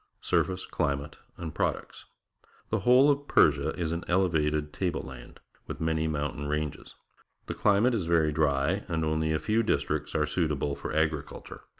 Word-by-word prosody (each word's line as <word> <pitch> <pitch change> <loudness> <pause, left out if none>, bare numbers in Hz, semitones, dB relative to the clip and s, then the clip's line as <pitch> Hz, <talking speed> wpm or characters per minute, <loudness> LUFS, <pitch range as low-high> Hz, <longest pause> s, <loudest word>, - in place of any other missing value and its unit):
Surface, 95 0 0
Climate, 70 +1 -2 0.2
and 80 -3 -6
Products. - - -3 0.3
— - - -32
The 110 - +1
whole 125 +7 +5
of 145 0 -2
Persia 75 0 +4
is 80 -2 -1
an 85 +1 -3
elevated 75 -5 +1
table 90 -4 -2
land. - - -11 0.3
with - - -6
many 80 0 0
mountain 75 -1 -3
ranges. 75 -1 -4 0.5
The - - -4
climate 105 +5 +3
is 100 -8 -1
very 80 -2 +3
dry, 75 +5 +1
and 80 -3 -1
only 80 0 0
a 80 - +2
few 110 +7 +1
districts 110 - -1
are 75 - +2
suit 80 +2 0
able 70 -1 -2
for - - -6
agriculture. 80 -2 -3
80 Hz, 170 wpm, -28 LUFS, 75-90 Hz, 0.5 s, whole